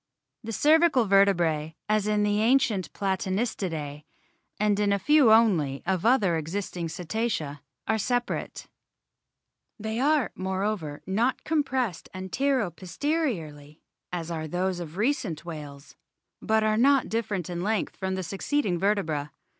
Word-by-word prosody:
The 225 - -5
cervical 300 - +4
vertebrae, 170 -6 +2
as 215 -1 +1
in 210 0 +2
the 205 0 +1
ancient 225 -5 +2
Platanistidae 190 -6 -2 0.6
and 210 -1 +2
in 205 -1 +2
a 200 - +3
few 280 +3 +5
only 175 -12 +3
of 185 +2 0
other 205 -9 +3
existing 170 +1 -4
Cetacea, 160 -4 -3 0.3
are 220 0 +1
separate; 245 +3 -2 1.1
they 220 +2 -3
are, 290 -1 +2
moreover, 190 -5 -3
not 225 +7 0
compressed 265 - -1
antero 220 +3 0
posteriorly 170 - -3 0.3
as 170 -1 -4
are 160 -1 -3
those 180 +2 -1
of 170 0 -7
recent 210 - -1
whales, 145 -4 -9 0.5
but 220 0 +2
are 215 0 +2
not 275 +3 +4
different 210 -6 -2
in 175 -1 -4
length 215 +3 -1
from 190 -1 -3
the 185 - -3
succeeding 195 - -1
vertebrae. 165 -7 0
195 Hz, 130 wpm, -27 LUFS, 170-225 Hz, 1.1 s, few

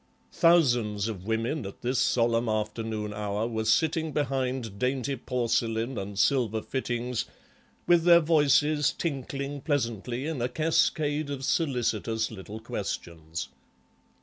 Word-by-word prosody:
Thousands 120 - +3
of 100 -3 -6
women, 115 +6 -1
at 95 -1 -9
this 125 +2 +1
solemn 115 -1 +2
afternoon 110 0 -2
hour, 105 +1 -2
were 110 -1 -2
sitting 160 +7 +2
behind 130 -6 -2
dainty 130 +2 0
porcelain 115 -1 -1
and 100 0 -6
silver 115 -4 +2
fittings, 120 -2 -2 0.6
with 175 -1 +4
their 170 0 +8
voices 150 -2 +3
tinkling 140 -2 -4
pleasantly 125 - -2
in 155 -5 -3
a 120 - 0
cascade 155 0 +1
of 135 -2 -4
solicitous 115 - 0
little 105 +1 -8
questions. 85 -7 -5
120 Hz, 120 wpm, -28 LUFS, 110-145 Hz, 0.6 s, their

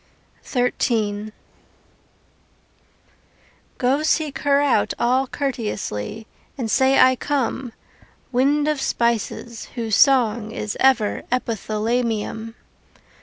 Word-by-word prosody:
XIII 215 -4 -1 2.5
Go 260 +4 +1
seek 310 -2 0
her 280 -1 +3
out 285 -2 +2
all 255 +3 +2
courteously, 220 - -4 0.3
And 230 -5 -3
say 265 0 +4
I 260 0 +6
come, 265 -2 -2 0.6
Wind 285 +4 +2
of 300 -3 0
spices 235 -1 -1
whose 225 -4 -1
song 235 -6 +3
is 215 -4 -4
ever 250 -6 +3
Epithalamium. 225 -1 -2
245 Hz, 85 wpm, -22 LUFS, 220-270 Hz, 2.5 s, I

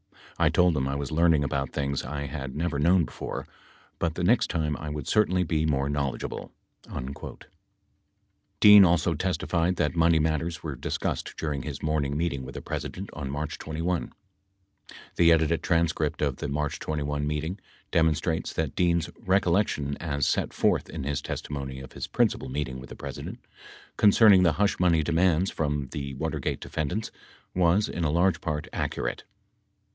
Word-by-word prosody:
I - - +4
told 90 -2 +3
him 65 -2 0
I 70 - -2
was 70 -2 -4
learning 80 -2 +4
about 70 -2 -2
things 70 -1 -1
I 70 +3 -4
had 65 0 -6
never 80 -2 -1
known 85 +2 +4
before, 60 - -6 0.5
but 80 -1 -1
the 90 - -2
next 115 +7 +3
time 75 -3 -1
I 75 - -6
would 75 -2 -5
certainly 95 -4 +3
be 80 -2 0
more 70 -2 +1
knowledgeable.. 70 -4 -3 0.2
." - - -25
19 65 +2 -6 1.2
Dean 105 -1 +10
also 85 -1 +3
testified 90 +1 0
that 75 0 0
money 85 0 +4
matters 80 +2 -1
were 75 -4 -4
discussed - - -3
during 75 -3 -2
his - - -6
morning 75 -2 0
meeting 80 -5 -1
with 65 - -9
the - - -5
President 95 +2 -5
on 70 -3 -5
March 75 +1 -4
21. 80 +3 -2 0.8
20 - - -14 0.2
The 85 -1 +6
edited 80 0 +3
transcript 80 -3 0
of 70 -3 0
the - - -4
March 75 +3 -2
21 75 -1 -2
meeting 80 +6 -3 0.3
demonstrates 80 0 +1
that 80 -4 -2
Dean's 85 -2 +1
recollection 90 -6 +1
as 70 -5 -1
set - - 0
forth - - +1
in 80 -4 -5
his 70 0 -2
testimony 70 -2 -5
of 65 -1 -10
his - - -5
principal - - 0
meet 70 +2 -2
ing 65 -1 -7
with 65 - -11
the - - -8
President - - -7 0.6
concerning 105 -2 +7
the 85 -4 +4
hush 100 +6 +1
money 85 -3 +3
demands 85 +2 +2
from 75 -3 -2
the 70 -2 -5
Watergate 80 0 -2
defendants 90 +9 -3 0.4
was 90 +3 +3
in 85 - -3
a 80 - +2
large 85 +5 +2
part 75 -2 -3
accurate. - - -2
80 Hz, 170 wpm, -27 LUFS, 70-85 Hz, 1.2 s, Dean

